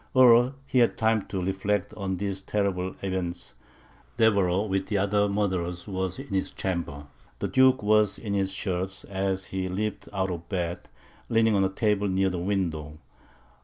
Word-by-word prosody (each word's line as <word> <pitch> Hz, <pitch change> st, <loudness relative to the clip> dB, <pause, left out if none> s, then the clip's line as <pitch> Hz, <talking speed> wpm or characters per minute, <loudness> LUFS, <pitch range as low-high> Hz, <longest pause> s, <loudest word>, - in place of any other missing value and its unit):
Ere 125 Hz, 0 st, +7 dB
he 130 Hz, -, +1 dB
had 120 Hz, -, +3 dB
time 110 Hz, -1 st, +2 dB
to 95 Hz, -2 st, -3 dB
reflect 95 Hz, 0 st, -1 dB
on 95 Hz, -2 st, -3 dB
these 100 Hz, 0 st, -3 dB
terrible 95 Hz, -2 st, -1 dB
events, 90 Hz, -2 st, -3 dB, 0.6 s
Deveroux, 100 Hz, -3 st, +3 dB
with 95 Hz, -1 st, -1 dB
the 105 Hz, -, 0 dB
other 100 Hz, +1 st, +2 dB
murderers, 90 Hz, -3 st, -1 dB
was 95 Hz, -2 st, -2 dB
in 135 Hz, +2 st, -8 dB
his 95 Hz, -1 st, -1 dB
chamber. 85 Hz, -6 st, -4 dB, 0.3 s
The -, -, -2 dB
Duke 130 Hz, -2 st, +4 dB
was 105 Hz, -1 st, +3 dB
in 105 Hz, -3 st, -4 dB
his 95 Hz, -1 st, 0 dB
shirt, 95 Hz, -1 st, -3 dB
as 95 Hz, -1 st, -1 dB
he 95 Hz, -1 st, -1 dB
had 90 Hz, -, -4 dB
leaped 105 Hz, +2 st, -3 dB
out 95 Hz, -2 st, -1 dB
of 85 Hz, -1 st, -6 dB
bed, 90 Hz, -2 st, -3 dB, 0.4 s
and -, -, -3 dB
leaning 115 Hz, -1 st, +4 dB
on 100 Hz, -1 st, +3 dB
a 95 Hz, -, +2 dB
table 105 Hz, +1 st, +1 dB
near 95 Hz, 0 st, +1 dB
the 90 Hz, -, -3 dB
window. 85 Hz, -6 st, -2 dB
95 Hz, 175 wpm, -27 LUFS, 95-105 Hz, 0.6 s, Ere